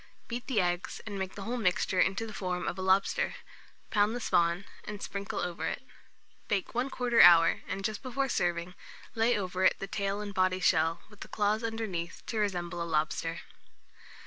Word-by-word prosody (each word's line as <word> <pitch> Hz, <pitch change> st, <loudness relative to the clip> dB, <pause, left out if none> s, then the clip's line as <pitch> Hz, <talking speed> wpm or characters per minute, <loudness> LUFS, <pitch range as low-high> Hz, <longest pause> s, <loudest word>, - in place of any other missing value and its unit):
Beat 240 Hz, +1 st, -5 dB
the 255 Hz, -6 st, +1 dB
eggs, 175 Hz, -1 st, -1 dB
and 205 Hz, -3 st, -5 dB
make 190 Hz, 0 st, -4 dB
the 200 Hz, -, -6 dB
whole 240 Hz, +4 st, -2 dB
mixture 185 Hz, -3 st, +1 dB
into 195 Hz, +5 st, +2 dB
the 220 Hz, -, -8 dB
form 180 Hz, -2 st, -3 dB
of -, -, -1 dB
a 190 Hz, -, -5 dB
lobster; 190 Hz, +1 st, +2 dB, 0.6 s
pound 210 Hz, +2 st, +3 dB
the -, -, -2 dB
spawn, 170 Hz, -3 st, +1 dB, 0.2 s
and 210 Hz, -1 st, -6 dB
sprinkle 200 Hz, 0 st, -5 dB
over 180 Hz, -1 st, -3 dB
it. -, -, -4 dB, 0.6 s
Bake 200 Hz, -3 st, 0 dB
1/4 245 Hz, -1 st, +2 dB
hour, 165 Hz, -1 st, +7 dB
and 195 Hz, 0 st, -3 dB
just 215 Hz, -1 st, -2 dB
before 270 Hz, +1 st, -1 dB
serving, 175 Hz, -5 st, -1 dB, 0.4 s
lay 230 Hz, +1 st, +2 dB
over 185 Hz, -1 st, -2 dB
it 185 Hz, -, +5 dB
the -, -, -4 dB
tail 200 Hz, 0 st, -2 dB
and 205 Hz, -1 st, -5 dB
body 185 Hz, -1 st, +2 dB
shell, 165 Hz, -2 st, +2 dB
with 210 Hz, -, -16 dB
the -, -, -8 dB
small -, -, -10 dB
claws 210 Hz, +1 st, +1 dB
underneath, 215 Hz, -7 st, -4 dB
to 225 Hz, -, -2 dB
resemble 175 Hz, -4 st, -1 dB
a 170 Hz, -, -3 dB
lobster. 160 Hz, +1 st, -1 dB
195 Hz, 190 wpm, -30 LUFS, 180-220 Hz, 0.6 s, hour